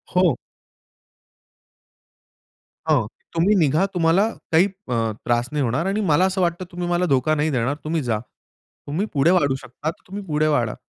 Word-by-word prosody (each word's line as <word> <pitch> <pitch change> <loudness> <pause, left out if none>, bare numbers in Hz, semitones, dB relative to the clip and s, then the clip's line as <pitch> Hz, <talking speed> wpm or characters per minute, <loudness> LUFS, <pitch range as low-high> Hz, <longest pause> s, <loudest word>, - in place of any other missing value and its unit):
हो. 180 -6 +4 2.5
हं, 140 -8 +3 0.3
तुम्ही 180 +6 +3
निघा. 160 0 +3
तुम्हाला 175 +4 +3 0.2
काही 165 +3 +5 0.2
अ, - - -2 0.3
त्रास 120 +1 +1
नाही 150 -1 0
होणार. 130 +7 0
आणि 200 +3 0
मला 175 +5 +4
असं 190 0 0
वाटतं 175 +1 0
तुम्ही 175 0 -4
मला 175 +1 +1
धोका 140 0 +2
नाही 155 +1 +1
देणार, 130 +1 0
तुम्ही 160 +1 -1
जा. 115 -3 0 0.7
तुम्ही 160 +8 -1
पुढे 150 +3 +4
वाढू 145 -7 +3
शकता, 135 +3 -6
तर - - -22
तुम्ही 200 +2 -6
पुढे 155 -2 +1
वाढा. 120 -8 +1
155 Hz, 160 wpm, -22 LUFS, 135-180 Hz, 2.5 s, काही